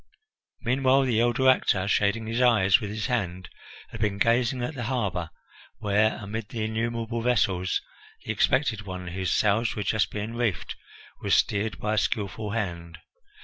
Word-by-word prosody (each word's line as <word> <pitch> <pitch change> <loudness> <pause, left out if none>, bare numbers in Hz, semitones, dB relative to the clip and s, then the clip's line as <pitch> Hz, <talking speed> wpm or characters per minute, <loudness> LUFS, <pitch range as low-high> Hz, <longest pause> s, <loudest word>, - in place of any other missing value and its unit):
Meanwhile 130 +2 +3
the 120 -4 +2
elder 120 +2 +2
actor, 100 -7 +3
shading 105 +2 +1
his 115 +3 -1
eyes 110 -5 +5
with 105 - -4
his 110 +1 -3
hand, 95 -8 -2 0.4
had 110 - -8
been 105 -2 0
gazing 120 +3 +2
at 140 - -3
the 125 -4 -5
harbour, 100 -9 -2 0.5
where, 105 +1 +2
amid 105 +1 -5
the 115 -2 -3
innumerable 115 +1 -2
vessels, 95 -7 +1 0.5
the - - -1
expected 130 -6 +1
one, 90 -2 -6
whose 90 0 -2
sails 110 +3 +2
were 105 - -2
just 110 +2 +1
being 105 +2 -5
reefed, 115 -7 -2 0.5
was - - +2
steered 105 +2 +1
by 105 +1 -2
a - - 0
skilful 105 +2 -2
hand. 85 -6 -4
110 Hz, 160 wpm, -26 LUFS, 100-120 Hz, 0.5 s, eyes